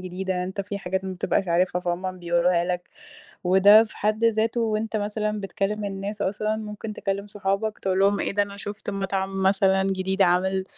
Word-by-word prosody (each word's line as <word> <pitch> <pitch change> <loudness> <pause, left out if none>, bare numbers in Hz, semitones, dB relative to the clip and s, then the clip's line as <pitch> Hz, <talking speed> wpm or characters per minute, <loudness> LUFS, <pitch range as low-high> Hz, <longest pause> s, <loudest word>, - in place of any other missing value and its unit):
جديدة، 185 0 -3
أنت 190 +2 -4
في 200 +1 -5
حاجات 190 0 -3
ما 190 - -3
بتبقاش 185 +1 -1
عارفها، 180 +1 +2
فهُم 180 +1 -3
بيوروها 175 0 +2
لك. 180 0 -3 0.6
وده 200 +4 +7
في 225 - -14
حد 215 +2 0
ذاته، 225 +1 +2
وأنت 220 -1 -1
مثلًا 210 0 -2
بتكلِّم 200 +1 -2
الناس 200 +1 -4
أصلًا، 215 +2 -1
ممكن 215 0 -6
تكلِّم 200 -1 -3
صحابك، 205 +1 -2
تقول 190 -1 -1
لهم: 200 +1 +3
"إيه - - -1
ده، 205 +1 +2
أنا 200 0 -6
شُفت 205 +1 -6
مطعم 195 -1 -2
مثلًا 190 0 +3
جديد 190 0 0
عامل، 190 +1 +2
195 Hz, 180 wpm, -25 LUFS, 185-210 Hz, 0.6 s, وده